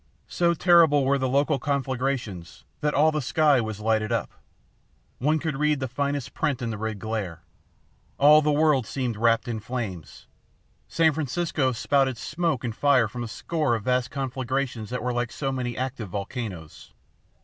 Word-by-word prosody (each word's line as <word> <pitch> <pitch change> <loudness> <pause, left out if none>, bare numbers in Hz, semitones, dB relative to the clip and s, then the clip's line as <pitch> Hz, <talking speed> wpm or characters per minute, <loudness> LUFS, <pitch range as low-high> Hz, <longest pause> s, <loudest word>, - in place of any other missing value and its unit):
So 170 -1 +1
terrible 160 -5 +5
were 140 +1 +2
the 130 -1 0
local 140 +2 +2
conflagrations 130 -9 -3 0.2
that 150 -1 0
all 155 +3 +4
the 155 -1 -1
sky 145 0 +3
was 110 -2 -5
lighted 110 0 0
up. 115 - -1 0.9
One 150 +5 +2
could 155 -3 -3
read 150 0 +1
the 130 - -2
finest 140 +1 -3
print 140 -4 -1
in 115 -2 -3
the 110 - -4
red 110 -1 -3
glare. 100 -5 -4 0.7
All 150 +2 +7
the 150 0 +1
world 145 -5 +2
seemed 125 -4 -2
wrapped 115 +2 +2
in 115 -2 -3
flames. 105 - -6 0.6
San 160 -1 +3
Francisco 150 -1 -1
spouted 130 +1 +1
smoke 160 +1 -2
and 115 -3 -3
fire 135 -5 +3
from 120 +3 -6
a - - -4
score 140 +3 -1
of 110 - -5
vast 125 0 +1
conflagrations 130 -3 -3
that 125 0 -4
were 125 0 -1
like 120 -1 -2
so 135 -2 -3
many 125 -2 -3
active 125 -5 -4
volcanoes. 95 - -6
130 Hz, 170 wpm, -25 LUFS, 115-145 Hz, 0.9 s, All